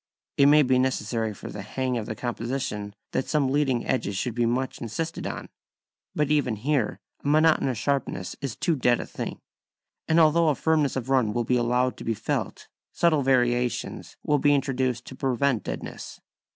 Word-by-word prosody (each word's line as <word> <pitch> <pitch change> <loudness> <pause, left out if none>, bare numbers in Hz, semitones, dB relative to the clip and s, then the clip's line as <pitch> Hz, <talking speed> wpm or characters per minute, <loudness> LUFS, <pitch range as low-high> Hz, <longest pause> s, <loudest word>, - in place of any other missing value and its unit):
It 140 - +5
may 150 +1 +7
be 130 -1 +3
necessary 115 -3 0
for 100 - -9
the 105 - -6
hang 130 +5 -2
of 115 -3 -3
the 110 - -4
composition 120 -4 -3 0.2
that 130 - -1
some 140 -4 +1
leading 135 -4 +1
edges 100 -7 -1
should 120 +4 -2
be 120 0 +1
much 130 +2 -2
insisted 160 +9 -4
on. - - -5 0.7
But 150 -1 +1
even 140 -7 +2
here 130 +1 0 0.2
a - - -4
monotonous 150 -4 +3
sharpness 120 -8 -2
is 135 -5 -3
too 170 - +1
dead 125 -3 +2
a - - -4
thing, - - -6 0.7
and 160 +1 +4
although 165 +1 +5
a 150 - +2
firmness 155 -1 +1
of 130 -1 -4
run 125 -6 +3
will 120 - 0
be 125 - +1
allowed 125 +1 +1
to - - -8
be 115 - -1
felt, - - -3 0.2
subtle 160 -4 +2
variations 125 -2 0
will 145 -1 +2
be 145 +1 +4
introduced 130 -3 -1
to 130 - -9
prevent 130 -2 0
deadness. - - -6
130 Hz, 180 wpm, -26 LUFS, 120-145 Hz, 0.7 s, may